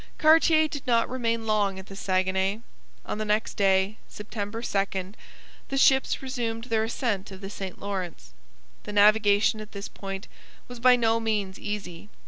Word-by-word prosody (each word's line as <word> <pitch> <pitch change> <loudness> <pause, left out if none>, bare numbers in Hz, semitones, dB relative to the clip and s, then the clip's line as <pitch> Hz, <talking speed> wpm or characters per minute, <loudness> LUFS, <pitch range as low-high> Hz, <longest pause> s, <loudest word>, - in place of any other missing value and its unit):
Cartier 315 0 +5
did 285 -3 -7
not 230 -2 +3
remain 230 -3 -1
long 205 -3 +1
at 190 - -8
the 195 - -11
Saguenay. 190 +2 0 0.4
On - - -4
the - - -1
next 215 +1 0
day, 195 0 +2
September 210 +2 -6
2, 195 -3 -2 0.6
the 270 - -2
ships 265 0 +3
resumed 235 -4 -3
their 225 -3 0
ascent 225 -4 -2
of 190 -1 -10
the 195 0 -7
St 190 -3 -6
Lawrence. 180 - -5 0.5
The 210 - -6
navigation 210 +1 +4
at 215 - -11
this 200 0 -6
point 195 0 -7 0.4
was 245 -1 -9
by 250 +1 +6
no 230 -1 +2
means 210 -4 -2
easy. 205 -2 -6
210 Hz, 160 wpm, -26 LUFS, 195-230 Hz, 0.6 s, by